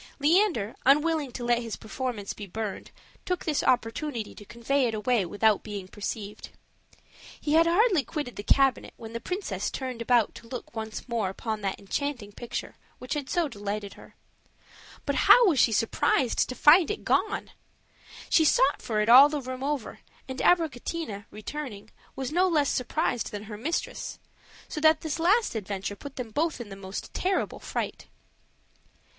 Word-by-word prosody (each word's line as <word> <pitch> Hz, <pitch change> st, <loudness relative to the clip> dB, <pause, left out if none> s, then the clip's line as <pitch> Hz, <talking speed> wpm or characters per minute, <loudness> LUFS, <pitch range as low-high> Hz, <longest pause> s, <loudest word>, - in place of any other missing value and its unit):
Leander, 305 Hz, -, +2 dB
unwilling 300 Hz, 0 st, +3 dB
to 245 Hz, -, -5 dB
let 240 Hz, 0 st, +2 dB
his 230 Hz, -2 st, -5 dB
performance 220 Hz, -3 st, -4 dB
be 205 Hz, -, -8 dB
burned, 215 Hz, +1 st, -5 dB, 0.3 s
took 360 Hz, -1 st, -2 dB
this 300 Hz, -3 st, +1 dB
opportunity 235 Hz, 0 st, -1 dB
to -, -, -12 dB
convey 240 Hz, +4 st, 0 dB
it 225 Hz, -, -2 dB
away 220 Hz, 0 st, +1 dB
without 205 Hz, +3 st, +2 dB
being 205 Hz, -3 st, -6 dB
perceived. 205 Hz, +1 st, -6 dB, 0.9 s
He 295 Hz, -, -1 dB
had 330 Hz, +1 st, +5 dB
hardly 365 Hz, -, +4 dB
quitted 275 Hz, 0 st, -5 dB
the -, -, -5 dB
cabinet, 270 Hz, +4 st, +2 dB
when 225 Hz, 0 st, -9 dB
the 230 Hz, -, -3 dB
princess 230 Hz, -, -3 dB
turned 255 Hz, -3 st, -5 dB
about 235 Hz, -2 st, +3 dB
to 230 Hz, -, -12 dB
look 240 Hz, -1 st, -8 dB
once 220 Hz, +1 st, -5 dB
more 230 Hz, -5 st, -1 dB
upon 215 Hz, +2 st, -4 dB
that 195 Hz, -1 st, -2 dB
enchanting 240 Hz, +1 st, -3 dB
picture, 240 Hz, +3 st, -6 dB, 0.2 s
which 250 Hz, -, -5 dB
had 290 Hz, -3 st, -4 dB
so 345 Hz, -3 st, +1 dB
delighted 205 Hz, -3 st, -5 dB
her. -, -, -16 dB, 0.9 s
But -, -, 0 dB, 0.2 s
how -, -, +9 dB
was 310 Hz, -8 st, +3 dB
she 230 Hz, -, +5 dB
surprised 225 Hz, +3 st, +1 dB
to 255 Hz, -, -4 dB
find 320 Hz, +6 st, +6 dB
it 420 Hz, -, -3 dB
gone! 425 Hz, -, 0 dB, 0.8 s
She 320 Hz, -, +4 dB
sought 285 Hz, -2 st, +3 dB
for 215 Hz, -2 st, -1 dB
it 210 Hz, -, 0 dB
all 260 Hz, +5 st, +9 dB
the 295 Hz, -1 st, -2 dB
room 255 Hz, -1 st, -6 dB
over; 280 Hz, -5 st, -3 dB, 0.3 s
and 260 Hz, 0 st, -6 dB
Abricotina, 315 Hz, -, 0 dB
returning, 215 Hz, 0 st, -7 dB, 0.2 s
was 265 Hz, 0 st, -4 dB
no 360 Hz, +4 st, +3 dB
less 300 Hz, -5 st, +2 dB
surprised 250 Hz, -2 st, -1 dB
than 205 Hz, 0 st, -6 dB
her 215 Hz, 0 st, -8 dB
mistress; 290 Hz, +11 st, -3 dB, 0.5 s
so 305 Hz, -, -5 dB
that 315 Hz, 0 st, +5 dB
this 315 Hz, 0 st, -3 dB
last 405 Hz, +8 st, +3 dB
adventure 200 Hz, -2 st, -4 dB
put 280 Hz, +6 st, -10 dB
them 240 Hz, -4 st, -6 dB
both 310 Hz, +4 st, 0 dB
in 235 Hz, -4 st, -7 dB
the 195 Hz, -, -8 dB
most 195 Hz, 0 st, -7 dB
terrible 380 Hz, +1 st, -1 dB
fright. -, -, -4 dB
250 Hz, 170 wpm, -27 LUFS, 215-300 Hz, 0.9 s, how